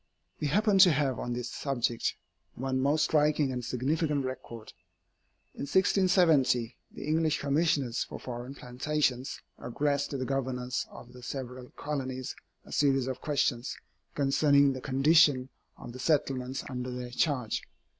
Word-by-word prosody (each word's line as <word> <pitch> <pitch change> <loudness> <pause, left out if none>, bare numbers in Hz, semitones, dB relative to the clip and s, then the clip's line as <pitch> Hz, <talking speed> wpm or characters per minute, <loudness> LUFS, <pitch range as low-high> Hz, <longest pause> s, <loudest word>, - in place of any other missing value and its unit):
We 150 - 0
happen 205 +5 +3
to 185 -2 +9
have 140 -4 0
on 120 - -3
this 120 0 -4
subject 120 -4 -1 0.4
one 130 +1 -1
most 145 +3 +2
striking 150 -2 +2
and 125 -1 -4
significant 140 +4 0
record. 120 -3 -7 0.8
In 140 - -5
1670, 165 - +3
the - - -8
English 155 0 +1
Commissioners 140 -4 +1
for - - -8
Foreign 125 +2 -7
Plantations 130 0 -1 0.2
addressed 145 +3 -1
to 140 - -3
the 130 - -2
Governors 125 -2 -2
of 125 +1 -13
the 125 - -12
several 125 0 -6
colonies 130 -3 -4 0.3
a - - -14
series 135 -3 +2
of 130 -1 -4
questions 135 -4 0 0.4
concerning 140 0 +4
the 130 - -6
condition 135 -1 +4 0.3
of 120 - -9
the 130 - -9
settlements 135 -2 0
under 125 -1 -4
their 125 -1 -5
charge. 125 -4 0
135 Hz, 140 wpm, -29 LUFS, 125-150 Hz, 0.8 s, to